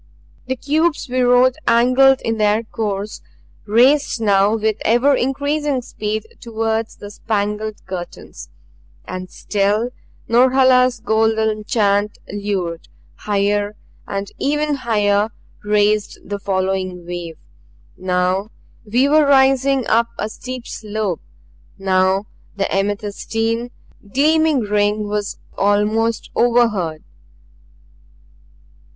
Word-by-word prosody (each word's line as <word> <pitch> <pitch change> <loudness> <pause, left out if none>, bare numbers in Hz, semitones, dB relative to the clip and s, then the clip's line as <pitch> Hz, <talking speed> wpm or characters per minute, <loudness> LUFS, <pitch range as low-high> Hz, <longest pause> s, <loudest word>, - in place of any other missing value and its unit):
The 260 - -1
cubes 305 +5 0
we 255 +1 0
rode 250 +1 +4
angled 255 +3 +5
in 225 -1 -2
their 210 +1 +2
course; 210 -2 -4 0.5
raced 255 +5 +3
now 200 -1 +3
with 220 -1 0
ever 240 +6 +3
increasing 285 +1 -1
speed 215 -1 -4
toward 225 -1 -2
the 205 - -9
spangled 210 0 -3
curtains. 180 -2 -8 0.6
And 185 0 -6
still 210 +6 -1 0.4
Norhala's 255 0 +4
golden 220 -1 +1
chant 205 -3 +1 0.2
lured; 195 -5 -3 0.3
higher 205 0 -1 0.3
and 195 0 -4
even 295 +1 0
higher 210 -5 +1 0.3
reached 210 0 +1
the 205 0 -4
following 190 -2 -2
wave. 175 -2 -6 0.6
Now 185 +2 0 0.3
we 240 +5 +2
were 300 0 +4
rising 270 0 +4
upon 230 +1 +2
a 215 - -3
steep 255 +2 -7
slope; 210 -4 -4 0.6
now 190 +1 +1 0.3
the 195 -1 0
amethystine, 220 +4 -2 0.4
gleaming 310 +1 +3
ring 210 0 0
was 205 -1 -3 0.2
almost 210 +3 +1
overheard. 230 -10 +1
215 Hz, 100 wpm, -19 LUFS, 205-250 Hz, 0.6 s, angled